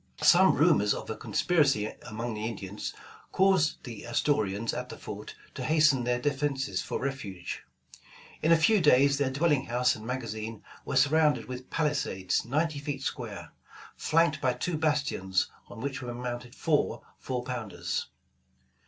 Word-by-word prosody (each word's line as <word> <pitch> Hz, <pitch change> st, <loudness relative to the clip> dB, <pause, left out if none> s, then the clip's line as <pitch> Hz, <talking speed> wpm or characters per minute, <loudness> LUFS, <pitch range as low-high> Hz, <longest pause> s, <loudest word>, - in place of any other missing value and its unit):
Some -, -, +7 dB
rumors 105 Hz, 0 st, +4 dB
of -, -, -6 dB
a -, -, -3 dB
conspiracy 140 Hz, -11 st, +1 dB, 0.2 s
among 115 Hz, +2 st, -4 dB
the 105 Hz, 0 st, -5 dB
Indians, 100 Hz, -2 st, -5 dB, 0.4 s
caused 190 Hz, -5 st, +3 dB
the 115 Hz, -5 st, -8 dB
Astorians 115 Hz, -4 st, 0 dB
at -, -, -4 dB
the -, -, -8 dB
fort -, -, -8 dB, 0.2 s
to -, -, -5 dB
hasten 150 Hz, -5 st, +4 dB
their 125 Hz, 0 st, +1 dB
de 145 Hz, +4 st, +1 dB
fenses 135 Hz, -8 st, -1 dB
for -, -, -3 dB
refuge. 105 Hz, -10 st, -5 dB, 0.8 s
In 160 Hz, -, +3 dB
a 165 Hz, -, +7 dB
few 200 Hz, +6 st, +4 dB
days 140 Hz, -2 st, +5 dB
their 140 Hz, -2 st, +2 dB
dwelling 140 Hz, 0 st, +1 dB
house 125 Hz, +1 st, +2 dB
and 110 Hz, -, -10 dB
magazine 115 Hz, -3 st, -5 dB, 0.2 s
were 140 Hz, -, -3 dB
surrounded 150 Hz, +2 st, +4 dB
with 130 Hz, 0 st, -8 dB
palisades 140 Hz, -, 0 dB
ninety 150 Hz, +5 st, 0 dB
feet 140 Hz, -1 st, -4 dB
square, 100 Hz, -, -5 dB, 0.4 s
flanked 155 Hz, -1 st, +2 dB
by 130 Hz, -1 st, +2 dB
two 180 Hz, +5 st, -2 dB
bastions 145 Hz, -, 0 dB, 0.2 s
on 110 Hz, -, -10 dB
which 140 Hz, 0 st, -3 dB
were 120 Hz, -1 st, -5 dB
mounted 120 Hz, 0 st, -5 dB
four, 155 Hz, -3 st, 0 dB, 0.2 s
four 125 Hz, -2 st, -3 dB
pounders. 120 Hz, -5 st, -3 dB
130 Hz, 155 wpm, -29 LUFS, 115-150 Hz, 0.8 s, Some